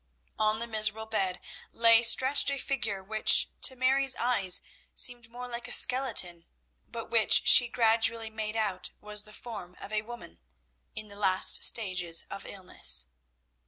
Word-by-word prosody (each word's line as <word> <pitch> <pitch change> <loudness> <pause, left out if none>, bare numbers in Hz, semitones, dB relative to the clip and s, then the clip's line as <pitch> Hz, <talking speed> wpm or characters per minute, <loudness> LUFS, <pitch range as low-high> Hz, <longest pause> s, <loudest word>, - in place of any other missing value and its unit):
On 215 0 +1
the 230 - -5
miserable 220 -1 0
bed 195 -5 -3 0.3
lay 230 0 +3
stretched 260 +5 +4
a 280 - -4
figure 225 -8 -4
which 215 +2 +2
to 260 - -1
Mary's 265 +1 0
eyes 210 -7 0 0.3
seemed 240 -2 -3
more 245 +1 -10
like 240 0 -8
a - - -9
skeleton, 180 -10 -1 0.4
but 230 -1 -10
which 225 -2 +3
she 245 - +8
gradually 225 -1 -1
made 220 0 -6
out 200 -4 -4
was 210 0 -3
the 210 - -11
form 210 -5 -11
of 210 - -11
a 210 - -2
woman, 220 - -12 0.6
in 215 0 -6
the 200 - -13
last 190 -2 +4
stages 185 -6 +2
of 195 - -9
illness. 65 - 0
220 Hz, 155 wpm, -27 LUFS, 195-240 Hz, 0.6 s, she